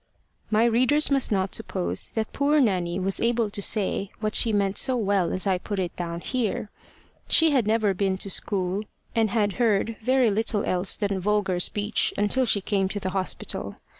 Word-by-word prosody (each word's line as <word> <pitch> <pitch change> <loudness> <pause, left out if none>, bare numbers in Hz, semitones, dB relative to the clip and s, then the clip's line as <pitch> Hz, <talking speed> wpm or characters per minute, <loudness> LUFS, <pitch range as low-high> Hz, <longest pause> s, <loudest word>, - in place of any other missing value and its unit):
My 220 +1 +3
readers 255 +6 +3
must 275 -4 +1
not 190 -2 0
suppose 90 +1 -2
that 220 -1 -3
poor 290 +2 +2
Nanny 185 -7 0
was 195 +1 0
able 230 -2 +1
to 200 - -2
say 200 -1 +1
what 215 0 -2
she 230 - +4
meant 200 -1 +1
so 260 -2 +3
well 200 -5 0
as 185 - -1
I 190 -2 +1
put 205 +2 -5
it 180 -3 -3
down 170 -1 -5
here. 220 -3 -3 0.6
She 325 -1 +4
had 255 -7 +1
never 215 -2 +2
been 190 0 -1
to 195 - -3
school, 190 0 -1 0.3
and 225 -1 +2
had 205 -1 0
heard 225 0 +1
very 255 -1 +2
little 215 0 0
else 180 +1 0
than 200 -2 -1
vulgar 195 -2 0
speech 205 +4 0
until 240 +5 +1
she 205 - +2
came 195 -1 0
to 205 - -4
the 185 -1 -4
hospital. 190 0 -3
205 Hz, 190 wpm, -25 LUFS, 190-230 Hz, 0.6 s, she